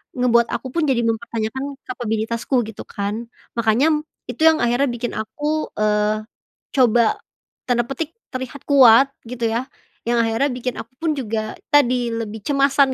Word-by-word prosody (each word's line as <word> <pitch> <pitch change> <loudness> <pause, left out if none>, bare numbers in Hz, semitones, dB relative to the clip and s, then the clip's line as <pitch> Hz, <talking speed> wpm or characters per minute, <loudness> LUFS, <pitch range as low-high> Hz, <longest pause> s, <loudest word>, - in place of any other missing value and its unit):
ngebuat 235 -2 +3
aku - - -3
pun 335 - +2
jadi 255 -3 +2
mempertanyakan 225 +2 -2 0.2
kapabilitasku 230 0 -2
gitu 220 - -8
kan, 205 +4 -4 0.3
makanya 255 +7 +2 0.2
itu 245 +4 -7
yang 320 -1 +5
akhirnya 245 +4 +2
bikin 240 0 -3
aku, 295 +8 -2
eee, 215 0 +1 0.5
coba, 240 -3 +4 0.5
tanda 240 -1 +2
petik 310 +3 -4 0.2
terlihat 260 +1 -6
kuat 270 0 +7 0.2
gitu 235 -1 -2
ya 235 +3 -1 0.4
yang 235 -1 +3
akhirnya 225 +6 +1
bikin 250 0 -3
aku - - -8
pun 325 -1 +1
juga 220 -4 -3 0.2
tadi 245 -4 +3
lebih 220 -1 -4
cemasan 275 -1 +3
240 Hz, 145 wpm, -21 LUFS, 225-270 Hz, 0.5 s, kuat